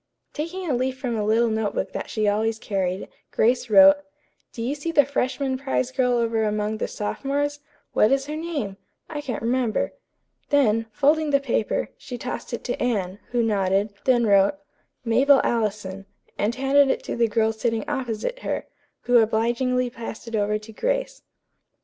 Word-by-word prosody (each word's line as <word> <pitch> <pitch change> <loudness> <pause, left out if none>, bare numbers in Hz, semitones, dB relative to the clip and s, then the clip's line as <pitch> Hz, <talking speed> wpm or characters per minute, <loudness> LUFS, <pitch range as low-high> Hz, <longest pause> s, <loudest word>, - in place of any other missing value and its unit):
Taking 350 +4 -4
a 290 - +1
leaf 255 +1 -1
from 250 -3 -2
a 215 - -1
little 225 +2 +2
note 220 -1 -1
book 190 - -2
that - - -5
she 215 -1 0
always 220 +2 +1
carried, 190 -4 -2 0.2
Grace 245 +2 +1
wrote: 290 +6 +8 0.5
"Do 230 - -6
you 255 +4 -1
see 295 +3 -4
the 290 -4 +5
freshman 265 -1 -1
prize 265 -2 -1
girl 255 -2 +1
over 230 -2 +1
among 210 0 -1
the - - -1
sophomores? 285 +6 -2 0.3
What 215 - +4
is 270 0 +2
her 300 +1 -5
name? 305 -12 -4 0.3
I 295 -2 -3
can't 250 -6 -4
remember." 240 -1 0 0.6
Then, 225 -6 +3
folding 300 +5 +2
the 280 -1 +4
paper, 245 -5 -1
she 250 - -7
tossed 250 +2 -5
it 235 - -4
to 245 - -3
Anne, 200 -5 -1
who 240 -1 +1
nodded; 200 -1 +1
then 245 -3 +4
wrote, 200 -1 +4 0.5
"Mabel 265 +5 +5
Allison," 200 -4 -2 0.3
and 215 +3 0
handed 275 +1 +4
it - - 0
to - - -4
the 235 -1 +3
girl 220 0 +1
sitting 225 -1 -2
opposite 265 - -3
her, - - -3 0.4
who 245 -1 +4
obligingly 240 +3 +1
passed 230 0 -8
it 230 - -3
over 210 0 +1
to 215 +1 -12
Grace. - - -2
235 Hz, 175 wpm, -24 LUFS, 215-275 Hz, 0.6 s, wrote